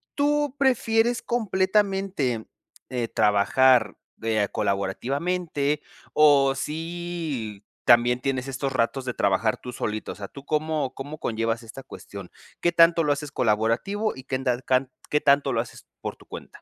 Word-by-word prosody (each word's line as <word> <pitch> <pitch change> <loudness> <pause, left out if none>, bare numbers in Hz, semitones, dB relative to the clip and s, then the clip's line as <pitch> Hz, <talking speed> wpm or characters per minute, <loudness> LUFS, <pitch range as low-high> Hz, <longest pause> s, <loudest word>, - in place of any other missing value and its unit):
¿tú 290 -1 +1
prefieres 240 -3 +2
completamente, 195 - 0 0.4
eh, 120 -2 -2
trabajar, 110 +2 +3 0.2
eh, 110 -2 +1
colaborativamente? 140 - -1 0.3
O 140 -3 +5
si 160 - -4 0.2
también 120 +1 +5
tienes 130 0 -2
estos 135 +1 -3
ratos 130 +1 0
de 125 -2 -4
trabajar 100 +2 +1
tú 125 - -8
solito, 110 0 -3
o - - -8
sea, 100 -1 -7
¿tú 140 0 -12
cómo 155 -3 -1
cómo 145 +3 -7
conllevas 115 0 -2
esta 115 +4 -9
cuestión? 100 -7 -10 0.3
¿Qué 175 - +3
tanto 165 0 +5
lo 150 - +2
haces 145 0 -2
colaborativo 115 - 0
y 130 - -10
qué 130 - -1
tan 125 -2 0
can 130 0 +1 0.2
qué 150 - +2
tanto 140 -1 +3
lo - - +1
haces - - -11 0.2
por - - -4
tu - - -20
cuenta? - - -8
135 Hz, 150 wpm, -25 LUFS, 115-170 Hz, 0.4 s, O